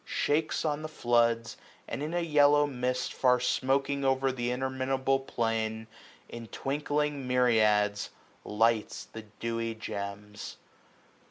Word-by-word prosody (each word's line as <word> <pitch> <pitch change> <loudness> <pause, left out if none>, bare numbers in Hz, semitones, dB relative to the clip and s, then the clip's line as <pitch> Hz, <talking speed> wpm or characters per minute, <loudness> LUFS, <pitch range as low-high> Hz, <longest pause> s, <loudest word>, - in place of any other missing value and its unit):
Shakes 155 +2 0
on 150 -1 0
the 155 - -4
floods, 120 -5 +1 0.3
and 120 - -4
in 150 +2 -3
a 175 - +1
yellow 145 -2 +4
mist. 125 -2 -2
Far 125 -1 +3
smoaking 135 +3 0
o'er 135 0 +2
th* 120 -2 -2
interminable 130 +1 0
plain. 115 -3 -2 0.4
In 115 -1 -8
twinkling 145 +1 -2
myriads 110 -5 +3 0.3
lights 110 +1 0
the 110 - -9 0.2
dewy 115 -1 -2
gems. 105 -1 -6
125 Hz, 115 wpm, -29 LUFS, 115-140 Hz, 0.4 s, yellow